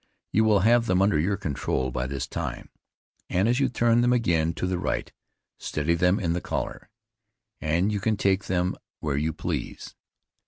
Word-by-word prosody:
You 110 +1 +3
will 105 -3 +4
have 115 +3 +4
them 90 0 +2
under 100 -5 +3
your 95 +5 +1
control 70 -7 -2
by 60 +1 -2
this 70 -1 -3
time, - - -5 0.6
and 95 +4 +2
as 120 +3 +2
you 140 - +2
turn 120 -1 +3
them 120 +1 +3
again 85 -9 +2
to - - -2
the 90 -1 -1
right, - - -2 0.5
steady 75 +3 -1
them 90 +3 +2
in 85 -3 0
the 90 - -2
collar, - - -4 0.7
and 85 +6 +1
you 105 - -1
can 110 +1 0
take 95 0 +1
them 90 0 0 0.3
where 75 -2 -2
you 75 +3 0
please. - - -5
90 Hz, 185 wpm, -26 LUFS, 80-110 Hz, 0.7 s, will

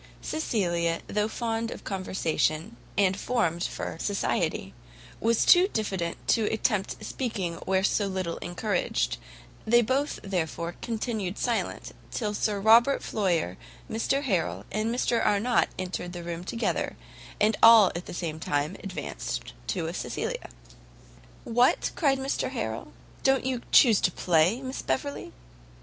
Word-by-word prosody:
Cecilia, 175 - 0
though 210 0 0
fond 225 0 -2
of - - -8
conversation 185 0 -1 0.2
and 195 -2 +3
formed 185 -6 0
for - - -4
society, 200 - -1 0.5
was 230 0 +2
too 360 +1 +7
diffident 190 - -2
to 225 - +3
attempt 210 -2 -1
speaking 195 -10 -3
where 190 0 +2
so 205 0 +2
little 185 -3 -3
encouraged; 175 - -1 0.5
they 240 +2 +4
both, 275 +6 0
therefore, 170 -3 -2
continued 220 -4 -3
silent, 240 -2 -2 0.2
till 210 -3 -2
Sir 205 0 0
Robert 230 +6 +5
Floyer, 170 - 0 0.3
Mr 270 +6 0
Harrel, 135 - -1
and 215 +2 0
Mr 235 -1 +1
Arnott 215 +4 +2
entered 180 -1 -4
the 175 -1 -6
room 170 0 -5
together, 230 +5 -2 0.4
and 215 +1 +3
all 225 -4 +9
at 175 - -5
the - - -7
same 160 -3 -4
time 150 +4 -1
advanced 75 - -5
to - - -2
Cecilia. - - -4 0.9
"What," 245 +3 +2
cried 275 -5 +2
Mr 270 +1 -1
Harrel, - - -4 0.3
"don't 270 -1 +2
you 255 -2 -1
chuse 230 -6 +7
to 180 - +3
play, 175 +9 +2
Miss 260 +1 -4
Beverley?" 140 +2 -3
205 Hz, 130 wpm, -27 LUFS, 175-230 Hz, 0.9 s, all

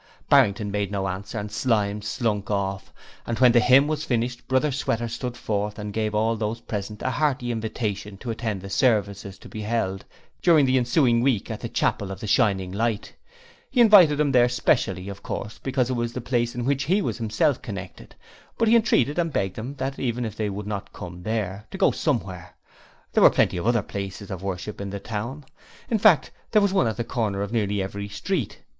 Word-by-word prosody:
Barrington 105 -6 +4
made 100 -1 -1
no 95 -1 -1
answer 95 +5 -5
and 105 0 -4
Slyme 105 -2 0
slunk 105 -1 -2
off, 95 -2 -2 0.4
and 115 - -2
when 125 0 +6
the 120 - +5
hymn 130 +5 +5
was 155 0 -2
finished 120 -3 -2
Brother 130 +3 +2
Sweater 120 -3 -1
stood 120 +1 -5
forth 105 0 -2
and 105 -1 -5
gave 110 -1 -1
all 110 +2 +2
those 110 +1 -3
present 105 0 -5
a 130 - 0
hearty 130 -4 0
invitation 105 -3 -3
to 115 - -5
attend 110 -4 -3
the 100 - -7
services 100 -5 +1
to - - -13
be 110 - -7
held 105 -3 -1 0.4
during 160 -5 +5
the 130 0 +3
ensuing 120 -1 +3
week 125 -6 +1
at - - -5
the - - -5
Chapel 100 - 0
of 95 - -6
the 110 - -6
Shining 95 -3 +2
Light. 110 +1 -2 0.6
He 260 - -1
invited 200 -10 +7
them 150 -2 +2
there 125 -2 +5
specially, 95 -6 +1
of 100 0 -7
course, 105 - -5
because 130 -2 0
it - - +1
was 120 -1 -2
the 125 - -3
place 120 -1 -1
with 120 -1 -3
which 135 0 0
he 185 +7 +2
was - - -3
himself 115 +4 +1
connected, 95 -4 -8 0.4
but 230 - +2
he 225 - +6
entreated 175 - +3
and 165 -2 0
begged 95 -5 -2
of 130 +6 -6
them 135 +1 -2
even 120 -1 -1
if 110 -1 -5
they 105 -2 -2
would 100 +1 -5
not 105 -1 -5
come 90 0 -8
there 105 0 -3
to - - -7
go - - +4
Somewhere; 95 - -3 0.6
there - - +3
were - - +9
plenty - - +1
of 85 - -2
other 120 -3 +2
places 100 0 -6
of 95 -2 -5
worship 100 +2 -5
in 100 - -4
the 100 +1 -5
town; 115 +8 -5 0.5
in 220 - +2
fact, 195 -7 +5 0.2
there 215 - +6
was 200 -1 +2
one 130 -11 +3
at 110 - -2
the 120 - -1
corner 105 -4 -2
of 100 - -5
nearly 105 -4 0
every 100 +1 -5
street. 120 - -3
110 Hz, 215 wpm, -24 LUFS, 100-130 Hz, 0.6 s, were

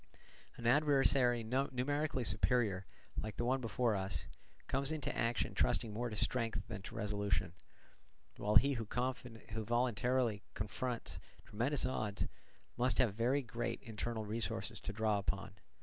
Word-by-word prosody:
An 120 - -7
adversary 135 -3 +4
numerically 135 +3 0
superior, 110 -5 +2 0.3
like 110 0 -4
the 120 - 0
one 130 +2 +2
before 115 0 +1
us, 95 -1 -2 0.4
comes 135 +2 0
into 155 -4 -2
action 115 0 0
trusting 105 +5 +2
more 120 +3 -2
to 105 - -5
strength 115 0 0
than 105 -5 -5
to - - -8
resolution; 100 -5 0 0.8
while 105 +1 0
he 140 +6 +7
who 115 -4 -3 0.8
voluntarily 120 -1 +1
confronts 120 +4 -3 0.3
tremendous 125 +7 0
odds 110 -6 -1 0.5
must 125 +2 +3
have 120 -6 +4
very 125 +6 +2
great 120 -1 -3
internal 110 -1 -3
resources 105 -2 -2
to - - -5
draw 105 -1 +1
upon. 100 0 -2
115 Hz, 135 wpm, -36 LUFS, 105-130 Hz, 0.8 s, he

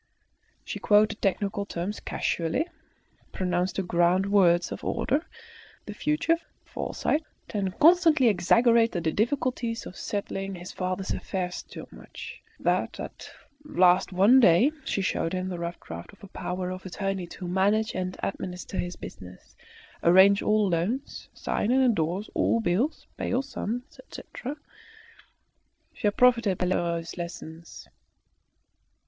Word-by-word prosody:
She - - -5
quoted 215 +1 +3
technical 200 0 0
terms 200 +1 -4
casually, 165 - -1 0.7
pronounced 180 0 -1
the 195 - -1
grand 180 +3 +2
words 175 -4 +4
of - - -6
order, 285 +6 0 0.6
the - - -6
future, 305 +2 +1 0.3
foresight, 310 +2 -2 0.3
and 195 -4 -2
constantly 325 -5 +6
exaggerated 225 +1 +3
the 160 - +1
difficulties 235 - -1
of 185 - -9
settling 195 -2 -4
his 175 +1 -8
father's 185 +1 -3
affairs 180 -2 -3
so - - -9
much, - - -10 0.2
that - - 0
at - - -8 0.3
last 185 -12 +3
one 200 +8 +6
day 230 - +5
she 195 - -1
showed 165 -2 -1
him 185 0 -2
the 180 -2 -5
rough 170 0 -4
draft 85 +1 -9
of - - -20
a - - -8
power 180 0 -4
of 185 0 -7
attorney 190 -1 -3
to 180 +1 -8
manage 205 +5 +1
and 185 0 -3
administer 180 0 -4
his 175 0 -3
business, 90 0 -11 0.5
arrange 190 +3 +6
all 215 -1 +2
loans, 190 +10 -2
sign 210 - -1
and 265 +2 +4
endorse 195 -3 0
all 230 - +2
bills, 225 - 0
pay - - -3
all 255 +3 +1
sums, 245 +2 -5
etc. 280 - -8 1.4
She - - -1
had 205 - 0
profited 235 -6 +4
by - - 0
Lheureux's 170 -2 -1
lessons. 170 -1 -8
195 Hz, 135 wpm, -27 LUFS, 180-230 Hz, 1.4 s, constantly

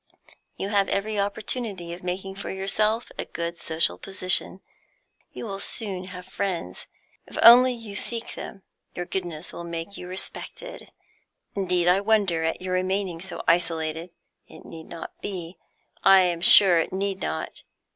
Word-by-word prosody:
"You 195 - -3
have 200 -2 +2
every 210 +1 0
opportunity 200 -3 -2
of 175 - -9
making 185 +2 -4
for 195 - -7
yourself 215 +4 0
a - - -1
good 170 0 -4
social 160 0 -1
position. 185 0 +1 0.7
You - - -7
will 195 -3 -5
soon 195 -3 -3
have 180 -1 -9
friends, 180 - -4 0.4
if - - -10
only 250 +2 +9
you 225 -4 -9
seek 230 +2 -1
them. 195 - -9 0.3
Your 175 - -3
goodness 175 -3 -4
will 170 - -7
make 170 +3 -5
you 180 - -8
respected. 485 - -7 0.6
Indeed 180 -3 +1
I 180 +2 +5
wonder 200 -6 +2
at 160 +2 -1
your 185 0 -2
remaining 185 -2 -1
so 190 0 -3
isolated. 165 -1 +1 0.4
It - - -14
need 160 -1 -10
not 170 - -9
be; 180 -3 -5 0.4
I 195 -1 +8
am 175 -2 +1
sure 180 -2 +8
it 165 - -1
need 195 0 -2
not. - - -4
190 Hz, 155 wpm, -25 LUFS, 175-200 Hz, 0.7 s, only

